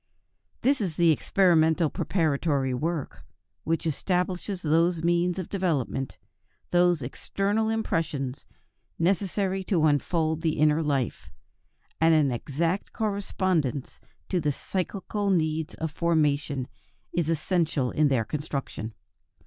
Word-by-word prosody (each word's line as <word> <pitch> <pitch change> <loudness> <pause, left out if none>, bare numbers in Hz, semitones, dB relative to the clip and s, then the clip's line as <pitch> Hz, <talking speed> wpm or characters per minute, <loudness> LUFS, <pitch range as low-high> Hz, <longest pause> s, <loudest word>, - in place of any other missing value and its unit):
This 270 0 +3
is 180 -6 -2
the 170 -1 +5
experimental 160 -2 +3
preparatory 145 -6 0
work, 155 - -3 0.4
which 165 +1 0
establishes 180 +4 -1
those 165 +2 +2
means 175 +1 +2
of 185 - -3
development, 150 - -1 0.5
those 175 -4 +3
external 200 - -1
impressions, 155 - -2 0.5
necessary 190 +2 0
to 170 -6 +2
unfold 160 +2 +1
the 160 -2 0
inner 155 +1 +3
life, 140 -6 -1 0.7
and 160 0 +5
an 145 -4 +3
exact 165 - -2
correspondence 185 - -1 0.3
to 185 - +1
the 150 -1 +1
psychical 195 +5 -3
needs 160 -3 0
of 160 -1 -3
formation 150 -5 +1 0.5
is 170 -2 0
essential 160 -5 0
in 155 -1 +3
their 130 -5 +1
construction. 135 -7 -4
165 Hz, 110 wpm, -27 LUFS, 145-180 Hz, 0.7 s, the